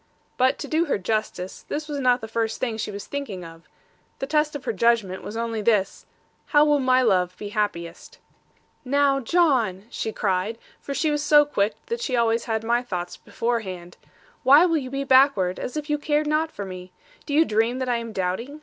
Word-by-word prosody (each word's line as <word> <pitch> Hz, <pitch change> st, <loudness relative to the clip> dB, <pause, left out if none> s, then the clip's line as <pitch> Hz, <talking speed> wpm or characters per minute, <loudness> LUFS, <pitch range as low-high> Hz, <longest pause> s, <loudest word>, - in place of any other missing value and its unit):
But 260 Hz, +1 st, +2 dB
to -, -, -6 dB
do 320 Hz, +2 st, +1 dB
her 290 Hz, -, 0 dB
justice, 190 Hz, -2 st, -3 dB
this 305 Hz, 0 st, -3 dB
was 290 Hz, -2 st, -4 dB
not 250 Hz, -1 st, +3 dB
the 220 Hz, -, -6 dB
first 225 Hz, 0 st, -2 dB
thing 240 Hz, -4 st, -1 dB
she 215 Hz, -, -3 dB
was 200 Hz, -1 st, -7 dB
thinking 220 Hz, -11 st, -5 dB
of: 165 Hz, 0 st, -14 dB, 0.5 s
the -, -, -3 dB
test 300 Hz, +1 st, +1 dB
of 285 Hz, -, -7 dB
her -, -, -1 dB
judgment 215 Hz, -3 st, +1 dB
was 220 Hz, -, -7 dB
only 230 Hz, -1 st, -2 dB
this, 205 Hz, -3 st, 0 dB, 0.4 s
'How 295 Hz, 0 st, +5 dB
will 295 Hz, -1 st, +3 dB
my 255 Hz, -1 st, +3 dB
love 180 Hz, -5 st, +1 dB
be 205 Hz, -, -6 dB
happiest?' 190 Hz, -5 st, -4 dB, 0.7 s
'Now, 275 Hz, +1 st, +2 dB
John,' 250 Hz, -, +1 dB
she 220 Hz, -, -3 dB
cried; 200 Hz, +2 st, -1 dB, 0.2 s
for 280 Hz, -, -6 dB
she 310 Hz, +1 st, +1 dB
was 295 Hz, 0 st, 0 dB
so 295 Hz, 0 st, +6 dB
quick 210 Hz, -7 st, 0 dB
that 470 Hz, +1 st, -4 dB
she 260 Hz, -, -1 dB
always 230 Hz, -1 st, +1 dB
had 220 Hz, -1 st, -2 dB
my 235 Hz, +1 st, +1 dB
thoughts 180 Hz, -7 st, -5 dB
beforehand; 190 Hz, -7 st, -4 dB, 0.5 s
'why 285 Hz, +5 st, +7 dB
will 330 Hz, -2 st, +2 dB
you 260 Hz, -4 st, -4 dB
be 275 Hz, +1 st, -3 dB
backward, 260 Hz, -9 st, +4 dB
as 255 Hz, -, -5 dB
if 300 Hz, -1 st, -4 dB
you 295 Hz, -1 st, 0 dB
cared 300 Hz, 0 st, 0 dB
not 305 Hz, +2 st, +1 dB
for 200 Hz, -, -6 dB
me? 185 Hz, -1 st, -9 dB, 0.4 s
Do 285 Hz, -, -1 dB
you 320 Hz, +2 st, +5 dB
dream 225 Hz, +2 st, +1 dB
that 260 Hz, -1 st, -3 dB
I 245 Hz, -1 st, +1 dB
am 230 Hz, -1 st, -6 dB
doubting? 215 Hz, +10 st, -3 dB
235 Hz, 205 wpm, -24 LUFS, 205-285 Hz, 0.7 s, why